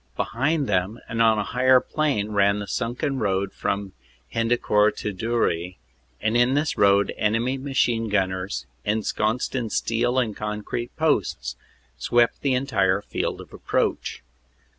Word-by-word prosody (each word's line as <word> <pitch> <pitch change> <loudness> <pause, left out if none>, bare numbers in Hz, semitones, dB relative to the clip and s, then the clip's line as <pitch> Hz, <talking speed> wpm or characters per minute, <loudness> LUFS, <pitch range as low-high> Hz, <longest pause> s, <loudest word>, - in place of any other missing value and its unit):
Be - - +2
hind 145 +5 0
them, 95 0 0
and 115 -1 -1
on 110 -1 +5
a 105 - 0
higher 130 +3 +4
plane, 130 -9 -1
ran 100 0 +3
the 105 - -4
sunken 125 +6 -2
road 95 -2 0
from 100 -1 -3 0.4
Hendecourt 115 -2 +2
to 105 - -3
Dury, 90 -5 -1 0.4
and 110 +2 0
in 120 +2 +4
this 145 +1 0
road 100 0 +3
enemy 115 +5 0
machine 120 -4 0
gunners, 95 -2 -1 0.2
ensconced 110 +2 -1
in 120 -4 -2
steel 120 +4 0
and 115 -5 +1
concrete 105 +3 -4
posts, 155 - 0 0.4
swept 120 -1 +2
the 135 -2 +1
entire 100 -7 +1
field - - -3
of - - -14
approach. - - -2
115 Hz, 140 wpm, -24 LUFS, 100-125 Hz, 0.4 s, on